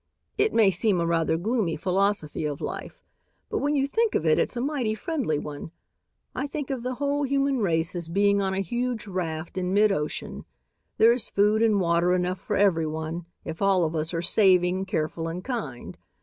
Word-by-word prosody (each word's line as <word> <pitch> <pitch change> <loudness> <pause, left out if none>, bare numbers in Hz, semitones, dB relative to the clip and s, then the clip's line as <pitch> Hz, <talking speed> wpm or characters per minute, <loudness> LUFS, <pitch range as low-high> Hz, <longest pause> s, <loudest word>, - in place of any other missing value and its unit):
"It 420 +1 +2
may 215 -4 +4
seem 200 -2 +1
a 170 - +1
rather 165 -1 +1
gloomy 205 -2 0
philosophy 190 -2 0
of 145 -2 -3
life, - - -6 0.5
but - - 0
when 290 +1 0
you 275 -1 +1
think 450 +8 +1
of 160 - 0
it, 155 -1 +4
it's - - -1
a - - 0
mighty 255 -5 -1
friendly 245 - -2
one. 145 +1 -6 0.6
I 270 - -3
think 285 -1 -5
of 260 -3 -3
the 250 +1 -3
whole 285 +2 -1
human 275 -1 +1
race 170 -4 0
as 170 -2 -3
being 200 +3 +3
on 190 -1 -1
a 195 - 0
huge 240 +4 -2
raft 170 -3 -4
in 185 +1 -1
mid 210 0 +5
ocean. 150 -5 -4 0.5
There's 235 +2 +4
food 210 +2 +2
and 220 -3 +3
water 170 0 +2
enough 180 0 -1
for 210 - -3
everyone 165 -3 0 0.2
if 160 +3 -6
all 195 -2 +3
of 160 +1 -3
us 155 +1 -1
are 170 -1 -2
saving, 185 0 +3
careful 165 -2 -2
and 175 +2 -5
kind. 200 - -5
195 Hz, 190 wpm, -26 LUFS, 165-235 Hz, 0.6 s, mid